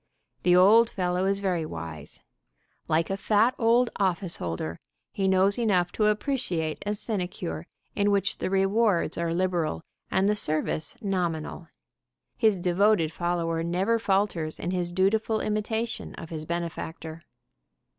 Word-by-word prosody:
The 180 0 +4
old 215 +6 +6
fellow 180 0 -1
is 195 +1 +1
very 180 -4 0
wise. 80 - -7 0.7
Like 165 +2 +1
a 195 - -1
fat 215 +4 +3
old 235 +1 +3
office 185 -2 0
holder, 85 -1 -4 0.3
he 195 -1 -1
knows 190 +3 +3
enough 185 -6 +2
to 215 - +1
appreciate 210 - -1
a 210 - 0
sinecure 180 -6 -3 0.3
in 205 0 +2
which 200 -1 +1
the - - -1
rewards 195 -2 +2
are 170 -1 -1
liberal 170 - -1 0.3
and 190 +1 +2
the 210 - +3
service 155 0 -2
nominal. 175 -4 -2 0.7
His 220 -4 +3
devoted 180 -1 +2
follower 170 -2 -1
never 185 +7 +1
falters 190 -7 0
in 175 - -2
his 175 -2 -2
dutiful 215 +4 +1
imitation 220 +2 -2
of 165 -3 -9
his 155 -1 -6
benefactor. 165 -1 -5
185 Hz, 135 wpm, -27 LUFS, 165-210 Hz, 0.7 s, old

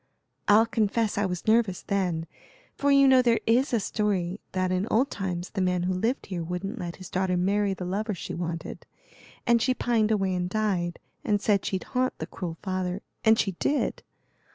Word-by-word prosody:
I'll 215 +2 +6
confess 225 -1 0
I 205 -1 +1
was 180 -1 -4
nervous 220 -4 +2
then, 180 -5 -1 0.5
for 285 - 0
you 275 0 +6
know 260 -1 +7
there 235 -2 +3
is 245 +5 +3
a 235 - +2
story 200 -3 -1
that 185 -1 0
in 185 +3 0
old 255 +6 +2
times 180 -3 -4
the 195 - -2
man 180 -1 +1
who 185 +1 0
lived 225 +9 -1
here 180 -3 -4
wouldn't 185 +7 -4
let 175 -2 -5
his 185 - -10
daughter 185 0 0
marry 200 +2 +1
the 180 - -5
lover 205 +3 -2
she - - -6
wanted, 165 -1 -5 0.6
and 235 -1 +4
she 255 +2 +2
pined 225 -4 +1
away 195 -4 +1
and 180 0 -1
died, 185 -5 -1 0.3
and 205 -2 +1
said 205 -1 +1
she'd 190 -2 -2
haunt 255 0 -1
the - - -4
cruel 170 -3 -6
father, 185 0 -2 0.2
and 220 0 +5
she 195 - +1
did. 290 - 0
195 Hz, 195 wpm, -27 LUFS, 180-225 Hz, 0.6 s, know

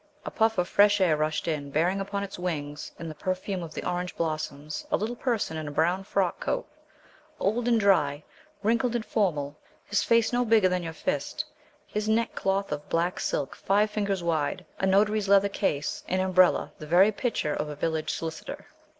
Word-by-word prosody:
A - - -4
puff 225 -1 +2
of 180 0 +1
fresh 205 0 +5
air 175 -5 +4
rushed 155 +2 -1
in, 150 -3 -2
bearing 175 +7 +1
upon 200 +1 -3
its 195 -2 -7
wings, 150 -4 -4
in 165 - -6
the 155 - -5
perfume 185 +4 -3
of 165 -2 -8
the - - -4
orange 180 0 -3
blossoms, 155 -2 -3
a - - +3
little 225 +3 -3
person 230 -10 -1
in 155 -1 -4
a - - -4
brown 175 +6 +1
frock 190 -2 0
coat, - - -2 0.7
old 230 +4 0
and 235 -2 +4
dry, 155 -8 +3 0.4
wrinkled 235 +3 +2
and 230 -2 -1
formal, 150 -10 0 0.3
his 205 0 +1
face 230 +2 +3
no 245 0 +3
bigger 220 -4 +4
than 180 0 0
your 165 -1 -4
fist, 280 - -2 0.4
his 210 0 -3
neckcloth 200 -4 0
of 150 0 -4
black 170 +2 0
silk 140 -2 -2
five 210 +2 +2
fingers 200 -4 -1
wide, 170 +2 -1
a 190 - +1
notary's 205 +1 +3
letter 200 0 +5
case, 150 -7 -1
and 185 - 0
umbrella 185 -1 +3
the 155 - -8
very 185 +6 +6
picture 210 - -1
of 150 - -2
a 150 - -5
village 160 +1 -1
solicitor. 160 -1 -5
185 Hz, 190 wpm, -27 LUFS, 155-205 Hz, 0.7 s, very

